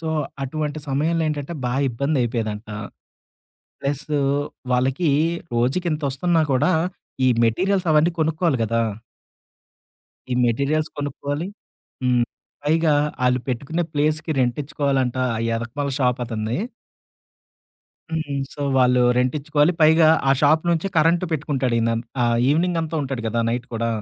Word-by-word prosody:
So, 160 - -4 0.3
అటువంటి 150 +2 -3
సమయంలో 160 +4 +1
ఏంటంటే 150 +2 -4
బా 125 - 0 0.2
ఇబ్బంది 140 +4 -1
అయిపోయేదంట. 110 -2 -3 1.1
ప్లసు 145 +1 -2 0.5
వాళ్ళకి 135 +6 +1 0.4
రోజుకి 130 +10 +1
ఇంత 150 0 -3
ఒస్తున్నా 165 +5 +1
కూడా 145 +7 +3 0.6
ఈ - - +6 0.2
మెటీరియల్స్ 185 - +1
అవన్నీ 155 +3 +4
కొనుక్కోలి 160 -1 +1
గదా! 115 +1 +1 1.5
ఈ - - +1
మెటీరియల్స్ 140 +6 0
కొనుక్కోలి. 145 +4 -3 0.6
హ్మ్. 125 -1 +3 0.4
పైగా 160 0 +3 0.3
ఆళ్ళు 125 0 +2
పెట్టుకునే 140 +8 -1
ప్లేస్‌కి 155 +2 0
రెంట్ 120 -1 +1
ఇచ్చుకోవాలంటా 135 -3 0
ఆ - - -3 0.2
ఎనకమాల 140 +5 -3
షాపు 125 -1 +1
అతన్ని 110 +3 -2 1.5
హ్మ్. 155 -3 -2 0.2
సో, 145 - -10 0.2
వాళ్ళు 125 -1 +4 0.2
రెంటించుకోవాలి. 145 +5 +2
పైగా 160 +1 +6 0.2
ఆ - - +5
షాపు 155 +3 +4
నుంచే 170 +3 0
కరెంట్ 165 +3 +3
పెట్టుకుంటాడు 135 -5 -1
ఈయన. 115 0 +1 0.3
ఆహ్, 120 0 +2
ఈవినింగ్ 170 +3 +2
అంతా 160 0 -4
ఉంటాడు 130 -4 -4
కదా! 115 +1 0
నైట్ 120 +1 -2
కూడా. 115 +1 -1
145 Hz, 125 wpm, -22 LUFS, 125-155 Hz, 1.5 s, ఈ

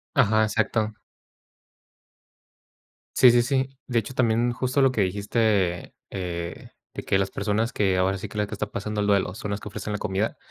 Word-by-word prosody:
Ajá, 110 +1 +4
exacto. 110 0 0 2.2
Sí, 125 - +8
sí, 120 0 +5
sí. 130 +1 0 0.2
De 120 -2 +1
hecho, 125 +3 -3
también 120 0 +2
justo 130 +3 0
lo 135 -1 +4
que 110 - +1
dijiste, 100 -2 0 0.2
eh, 85 -2 -5 0.2
de - - -5
que 95 - +1
las 95 0 0
personas 110 +3 -1
que 95 -4 +1
ahora 95 +1 +2
sí 105 +1 -6
que 105 - -7
las 105 - +1
que 110 - -7
están 105 0 -4
pasando 105 +1 -3
el 100 - 0
duelo 100 -2 +2
son 105 - -5
las 100 0 -2
que 105 - -7
ofrecen 105 +1 -5
la 105 - -2
comida, 100 +2 -1
105 Hz, 190 wpm, -25 LUFS, 95-115 Hz, 2.2 s, Sí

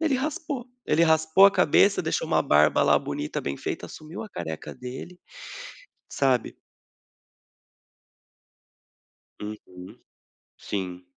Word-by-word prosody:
Ele 320 -4 +1
raspou. 285 -2 -3 0.2
Ele 155 +2 +3
raspou 160 +4 +5
a - - +5
cabeça, 195 +3 +4
deixou - - -1
uma - - +3
barba 75 +1 +4
lá, - - +5
bonita, 75 - -4
bem 70 0 -4
feita, - - -5
assumiu 155 +2 -9
a 220 - -9
careca 80 - -6
dele, 130 +8 -8 0.9
sabe. 130 -4 +1 2.9
Uhum. 90 -4 -9 0.6
Sim. 90 -3 -5
155 Hz, 105 wpm, -26 LUFS, -, 2.9 s, raspou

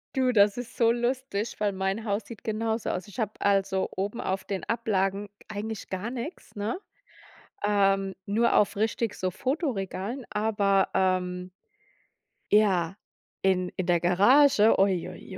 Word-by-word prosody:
Du, 255 -1 +3
das 205 -1 +4
ist 245 -1 -7
so 230 -1 +4
lustig, 240 -2 -2
weil 205 -1 +1
mein 195 +3 -2
Haus 205 -1 -2
sieht 225 0 -11
genauso 220 +1 -1
aus. 185 +3 -3
Ich 205 - -10
habe 215 -2 0
also 195 -1 +1
oben 200 +4 -3
auf 190 +1 -2
den 195 -2 -4
Ablagen 205 -3 -1
g 200 - -44 0.2
eigentlich 215 0 -5
gar 190 +4 -3
nix, 260 +7 -7
ne, 215 - -3 0.9
ähm, 195 -2 +2
nur 225 +4 +2
auf 210 - +3
richtig 220 +1 0
so 185 - -2
Fotoregalen, 245 - -3
aber, 205 -2 +2
ähm 180 -1 0 1.0
ja, 195 -4 +3 0.5
in 185 -1 +2
in 185 - -1
der 175 -1 +3
Garage, 215 - +5
ui, 190 -3 +2
ui, 190 - -10
205 Hz, 150 wpm, -27 LUFS, 190-230 Hz, 1.0 s, Garage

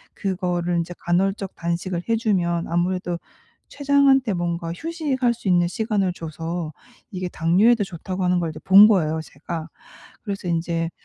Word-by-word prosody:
그거를 180 -3 -1
인제 170 +1 -4
간헐적 190 +2 0
단식을 170 +1 -3
해 230 - +3
주면 175 -7 0
아무래도 175 0 -1 0.5
췌장한테 280 -4 +3
뭔가 170 -1 -2
휴식할 285 - -1
수 220 -4 -4
있는 175 -1 +4
시간을 200 -2 -1
줘서 165 0 -5 0.4
이게 185 -2 -4
당뇨에도 200 +8 +3
좋다고 185 +1 -5
하는 180 0 +2
걸 165 -2 -2
이제 155 - -10
본 200 +2 +9
거예요 160 -7 +2
제가. 160 +2 -7 0.6
그래서 195 -4 -5
인제 165 0 -1
180 Hz, 325 characters per minute, -23 LUFS, 170-205 Hz, 0.6 s, 본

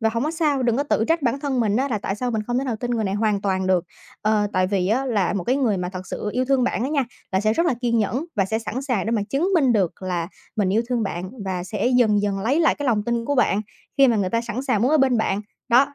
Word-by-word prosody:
Và 225 - +2
hổng 230 +4 -1
có 310 - 0
sao, 300 -5 0
đừng 235 -2 +2
có 280 - +1
tự 225 -6 +1
trách 330 -2 +2
bản 255 +2 0
thân 270 -4 -1
mình 210 -2 +1
á 270 +3 +1
là 220 -5 -1
tại 195 - -3
sao 245 +4 -2
mình 220 -2 -1
không 245 +1 0
thể 270 - -1
nào 245 -4 -2
tin 245 +2 -4
người 225 -3 0
này 190 - -1
hoàn 210 -1 +1
toàn 190 -2 -1
được. 185 -2 +2 0.4
Ờ, 210 -1 +2
tại 185 -1 +2
vì 190 -2 0
á 255 +6 +1
là 210 -7 +1
một 190 -4 -2
cái 255 +3 +1
người 235 -8 +1
mà 180 -1 -3
thật 185 0 -7
sự 210 - -4
yêu 255 +1 0
thương 265 -1 +2
bạn 240 - -1
á 260 - -1
nha, 280 -3 +1 0.3
là 190 - +2
sẽ 215 +1 +2
rất 335 +9 +1
là 265 - +2
kiên 235 -2 +1
nhẫn 245 +8 0
và 195 - +3
sẽ 220 +3 -1
sẵn 235 +4 -4
sàng 245 -8 -1
để - - 0
mà 220 -3 +1
chứng 310 +8 +1
minh 270 -7 +4
được 190 -4 0
là 175 -2 -2 0.3
mình 200 -3 +1
yêu 225 +3 +2
thương 245 -2 0
bạn 185 -2 -4
và 185 -2 -3
sẽ 210 +5 -2
dần 210 -4 +3
dần 200 -1 -1
lấy 270 +10 +1
lại 325 - +4
cái 290 - -4
lòng 220 -4 +2
tin 235 +1 -1
của 285 - 0
bạn, 215 -5 +2 0.4
khi 270 -2 +7
mà 230 - +3
người 190 -3 0
ta 230 - +1
sẵn 235 +2 -4
sàng 235 -6 +1
muốn 255 - +3
ở 310 - +4
bên 260 -3 +3
bạn. 205 -2 0 0.3
Đó, 275 +4 +4
230 Hz, 310 wpm, -23 LUFS, 200-260 Hz, 0.4 s, khi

